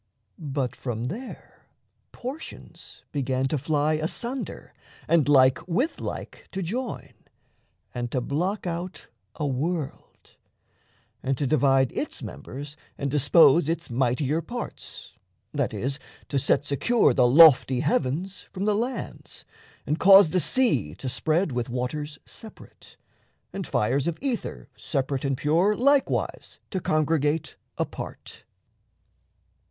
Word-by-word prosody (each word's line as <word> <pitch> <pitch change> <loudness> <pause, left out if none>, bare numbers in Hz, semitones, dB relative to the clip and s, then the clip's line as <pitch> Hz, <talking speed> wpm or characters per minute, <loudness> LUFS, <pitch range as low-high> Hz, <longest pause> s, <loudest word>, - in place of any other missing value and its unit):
But 135 -5 -3
from 120 -3 -4
there 235 - -9 0.4
Portions 270 +6 -9
began 130 -2 -1
to 150 - 0
fly 150 +2 +1
asunder, 235 - -4 0.3
and 160 -4 +3
like 130 -2 +5
With 245 - 0
like - - -7
to 190 -1 -2
join, 240 +8 -4 0.8
and 120 0 -3
to 130 - -1
block 175 - -2
out 175 +1 -5 0.3
a 150 - -3
world, 145 +3 -4 0.9
And 135 0 -1
to 145 - -1
divide 135 -3 +3
its - - -4
members 145 +3 -8 0.2
and 140 -1 -2
dispose 150 +1 +5
Its 165 -4 -2
mightier 130 +5 +1
parts 240 +9 -8 0.4
that - - 0
is, 135 +3 -3 0.3
to 140 - +1
set 145 +1 +2
secure 180 - +2
The 125 -3 +4
lofty 135 -2 +7
heavens 160 +6 -1
from 190 +1 -3
the 210 - +3
lands, 245 +5 -4 0.4
and 150 +2 -1
cause 195 -3 +8
The 185 - +2
sea 155 - +1
to 130 - -7
spread 160 +6 0
with 120 -1 -2
waters 145 +5 -3
separate, 220 - -14 0.6
And 195 -5 -5
fires 130 +7 +1
of 170 -1 -1
ether 260 -4 -3
separate 135 -2 -2
and 135 -2 0
pure 170 +10 +2
Likewise 280 +3 +1
to 190 - -1
congregate 155 -1 0 0.2
apart. - - -6
150 Hz, 125 wpm, -25 LUFS, 135-185 Hz, 0.9 s, cause